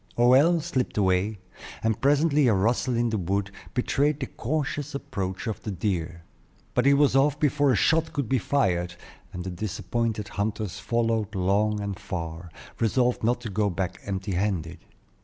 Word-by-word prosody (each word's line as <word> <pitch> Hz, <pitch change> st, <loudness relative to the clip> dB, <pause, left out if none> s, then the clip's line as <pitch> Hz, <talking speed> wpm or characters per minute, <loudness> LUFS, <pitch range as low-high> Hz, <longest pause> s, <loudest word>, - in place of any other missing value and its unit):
Hoël 135 Hz, +8 st, +5 dB
slipped 130 Hz, -10 st, -2 dB
away, 95 Hz, +2 st, +2 dB, 0.5 s
and 110 Hz, -2 st, 0 dB
presently 145 Hz, 0 st, +3 dB
a 110 Hz, -, +4 dB
rustle 120 Hz, +5 st, +1 dB
in 120 Hz, -1 st, +1 dB
the 110 Hz, -, 0 dB
wood 100 Hz, +2 st, -1 dB, 0.2 s
betrayed 140 Hz, +3 st, +1 dB
the 135 Hz, -, -2 dB
cautious 145 Hz, +2 st, -3 dB
approach 95 Hz, -8 st, -4 dB
of 110 Hz, -3 st, -3 dB
the -, -, -5 dB
deer. 85 Hz, -4 st, -2 dB, 0.5 s
But 125 Hz, +2 st, +2 dB
he 140 Hz, -, +7 dB
was 145 Hz, -1 st, +3 dB
off 145 Hz, +2 st, +3 dB
before 145 Hz, -1 st, +3 dB
a -, -, +3 dB
shot 160 Hz, +7 st, +2 dB
could 140 Hz, -6 st, -2 dB
be 130 Hz, +2 st, +2 dB
fired, 90 Hz, -10 st, 0 dB, 0.4 s
and 90 Hz, -2 st, -6 dB
the 95 Hz, -, -4 dB
disappointed 105 Hz, +3 st, -2 dB
hunters 105 Hz, -1 st, -3 dB
followed 115 Hz, -3 st, 0 dB
long 100 Hz, +3 st, +1 dB
and 100 Hz, -2 st, -4 dB
far, 85 Hz, -1 st, -5 dB, 0.3 s
resolved 120 Hz, +2 st, +1 dB
not 120 Hz, +2 st, +1 dB
to 115 Hz, -4 st, -5 dB
go 105 Hz, +1 st, +1 dB
back 90 Hz, 0 st, -3 dB
empty 95 Hz, 0 st, -3 dB
handed. 90 Hz, -3 st, -1 dB
110 Hz, 165 wpm, -26 LUFS, 95-135 Hz, 0.5 s, he